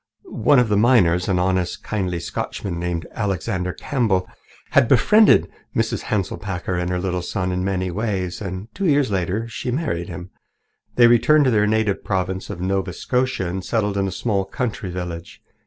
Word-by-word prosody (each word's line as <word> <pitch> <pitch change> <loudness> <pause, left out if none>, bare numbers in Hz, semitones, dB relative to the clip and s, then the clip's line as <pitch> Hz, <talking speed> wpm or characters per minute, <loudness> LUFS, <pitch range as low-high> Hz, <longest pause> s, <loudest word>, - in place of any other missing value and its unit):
One 145 - +3
of 125 -2 +4
the 105 - +2
miners, 95 -7 +4
an 95 - +2
honest, 90 -1 0
kindly 90 -5 -2
Scotchman 85 +1 -4
named 85 -1 -3
Alexander 95 -3 -2
Campbell, 110 -10 0 0.4
had - - +5
befriended 210 - +5 0.3
Mrs. - - -1
Hanselpakker 95 -2 -2
and 90 0 -1
her 90 - -1
little 90 -1 -2
son 90 0 -2
in 90 0 -1
many 95 -1 -1
ways, 95 -3 -2
and 95 +1 -5
two 195 -1 -1
years 140 -6 +3
later 95 +4 -1
she 115 - -7
had 125 - 0
married 110 - -2
him. 90 0 -8 0.6
They 120 - +6
returned 130 +6 +5
to 130 - +3
their 105 -2 +3
native 110 -2 0
province 95 -1 -2
of 100 -4 -6
Nova 95 0 -1
Scotia 125 -3 -1
and 90 +2 -4
settled 105 -2 -1
in 100 -1 0
a - - -3
small 100 -3 -1
country 105 -1 -4
village. 90 -2 -7
95 Hz, 175 wpm, -21 LUFS, 90-115 Hz, 0.6 s, They